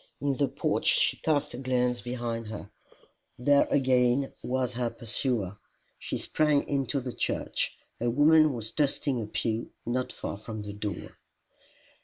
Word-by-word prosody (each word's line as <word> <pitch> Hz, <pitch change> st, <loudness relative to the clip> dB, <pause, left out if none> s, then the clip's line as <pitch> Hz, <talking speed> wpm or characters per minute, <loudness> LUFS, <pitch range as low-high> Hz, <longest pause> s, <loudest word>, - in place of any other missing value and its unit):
In 140 Hz, +1 st, +1 dB
the 140 Hz, -, +2 dB
porch -, -, -1 dB
she -, -, +4 dB
cast 150 Hz, -2 st, 0 dB
a 120 Hz, -, -6 dB
glance 125 Hz, -2 st, +1 dB
behind 120 Hz, -2 st, -3 dB
her: 105 Hz, -1 st, -7 dB, 0.7 s
there 140 Hz, +3 st, +4 dB
again 130 Hz, 0 st, +3 dB
was 125 Hz, 0 st, -1 dB
her 120 Hz, 0 st, 0 dB
pursuer! 115 Hz, -3 st, -1 dB, 0.4 s
She -, -, -3 dB
sprang 150 Hz, -2 st, +2 dB
into 140 Hz, 0 st, 0 dB
the 125 Hz, -1 st, -5 dB
church. -, -, -1 dB, 0.2 s
A 120 Hz, -, +1 dB
woman 155 Hz, +4 st, +6 dB
was 115 Hz, -3 st, -5 dB
dusting 140 Hz, -3 st, 0 dB
a 105 Hz, -, -4 dB
pew 110 Hz, +1 st, -2 dB, 0.2 s
not 125 Hz, +2 st, -1 dB
far -, -, -5 dB
from 110 Hz, 0 st, -6 dB
the 105 Hz, 0 st, -6 dB
door. 105 Hz, 0 st, -5 dB
125 Hz, 150 wpm, -29 LUFS, 115-140 Hz, 0.7 s, woman